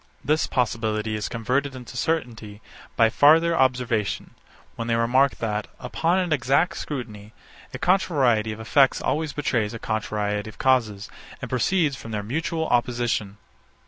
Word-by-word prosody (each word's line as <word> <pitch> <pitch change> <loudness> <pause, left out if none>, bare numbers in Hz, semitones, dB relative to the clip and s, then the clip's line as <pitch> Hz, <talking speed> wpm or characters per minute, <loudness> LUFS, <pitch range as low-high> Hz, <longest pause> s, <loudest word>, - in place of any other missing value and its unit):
This 155 +3 +1
possibility 110 -3 -1
is 105 - -3
converted 130 +5 -1
into 125 -1 -10
certainty 120 -8 -3 0.4
by 115 -1 +4
farther 165 +6 +5
observation, 125 -6 0 0.4
when 115 - -5
they 115 - +1
remark 125 +4 +3
that, 105 -2 -3
upon 170 +3 0
an 180 -4 +1
exact 140 +6 +1
scrutiny, 110 -7 -6 0.4
a - - -6
contrariety 135 - +2
of 110 - -7
effects 130 +5 +3
always 155 -1 -1
betrays 120 -7 -1
a - - -4
contrariety 105 -1 -2
of 110 - -14
causes, 110 -6 +1 0.3
and 125 - -7
proceeds 150 +3 +1
from 115 - -10
their 105 -2 -3
mutual 160 +7 -2
opposition. 120 -4 0
120 Hz, 145 wpm, -24 LUFS, 110-145 Hz, 0.4 s, farther